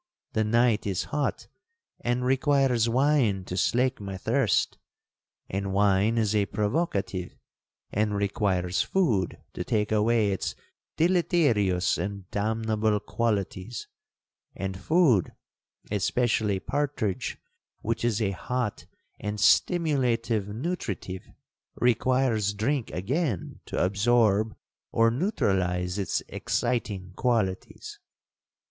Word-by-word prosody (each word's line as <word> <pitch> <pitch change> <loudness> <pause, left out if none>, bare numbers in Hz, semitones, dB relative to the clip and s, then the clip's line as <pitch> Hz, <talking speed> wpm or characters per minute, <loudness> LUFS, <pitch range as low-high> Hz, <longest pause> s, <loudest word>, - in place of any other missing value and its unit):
The 110 - +2
night 115 0 +2
is 95 -3 -1
hot, 145 -3 -1 0.5
and 120 +1 -1
requires 130 -3 +3
wine 125 -6 +2
to 90 - -5
slake 125 +6 +1
my 100 -1 -5
thirst—and 95 +1 -2
wine 100 +3 +3
is 110 -2 +1
a 100 -2 +2
provocative, 105 - -1 0.6
and 105 0 0
requires 95 -3 0
food 115 - +1 0.2
to - - -3
take 110 -4 0
away 110 -1 +3
its 95 - -2 0.4
deleterious 145 - +2
and 100 +1 -4
damnable 110 0 0
qualities—and 100 -3 -5
food, 145 - +3 0.6
especially 105 -1 +1
partridge, 135 -7 -2 0.4
which 115 +1 -2
is 120 -2 +1
a 100 - +1
hot 120 +4 -3 0.3
and 105 0 -4
stimulative 120 - +2
nutritive, 105 - -4 0.5
requires 120 -3 +2
drink 125 +4 -1
again 115 - -2
to - - -4
absorb 110 +1 +2 0.4
or 115 0 +4
neutralize 95 - 0
its 95 -4 -1
exciting 100 -7 -2
qualities. 110 -7 -1
110 Hz, 95 wpm, -27 LUFS, 100-125 Hz, 0.6 s, or